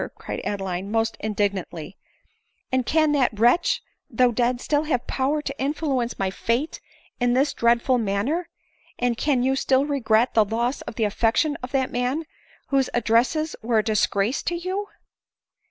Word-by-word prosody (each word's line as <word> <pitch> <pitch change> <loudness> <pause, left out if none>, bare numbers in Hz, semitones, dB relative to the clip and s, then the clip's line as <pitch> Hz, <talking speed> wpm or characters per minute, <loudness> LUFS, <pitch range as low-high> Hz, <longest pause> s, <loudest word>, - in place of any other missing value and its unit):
cried - - -6
Adeline, 195 -2 -3
almost 225 +2 0
indignantly, 200 -4 -2 0.4
" - - -46
and 260 -1 0
can 310 -1 +3
that 255 -7 +1
wretch, 290 +10 +3 0.3
though 250 -1 +3
dead, 240 +1 +1
still 295 +3 0
have 250 -6 -1
power 285 +3 -1
to 275 - -4
influence 275 -4 -1
my 190 -1 -1
fate 235 +10 -1 0.4
in 245 -1 +2
this 270 +4 +2
dreadful 235 +2 +2
manner? 230 - -1 0.5
and 245 -1 +1
can 260 0 +1
you 265 +1 +2
still 265 0 +2
regret 240 -4 +2
the 220 - +5
loss 235 +5 -1
of - - -10
the 225 - 0
affection 230 +8 +1
of 250 - -5
that 265 -2 0
man,' 250 +6 -1 0.5
whose 270 -2 +2
addresses 245 +7 +2
were 230 0 +1
a 215 - +3
disgrace 215 +2 +1
to 345 - -2
you 375 +4 -3
245 Hz, 160 wpm, -24 LUFS, 225-285 Hz, 0.5 s, the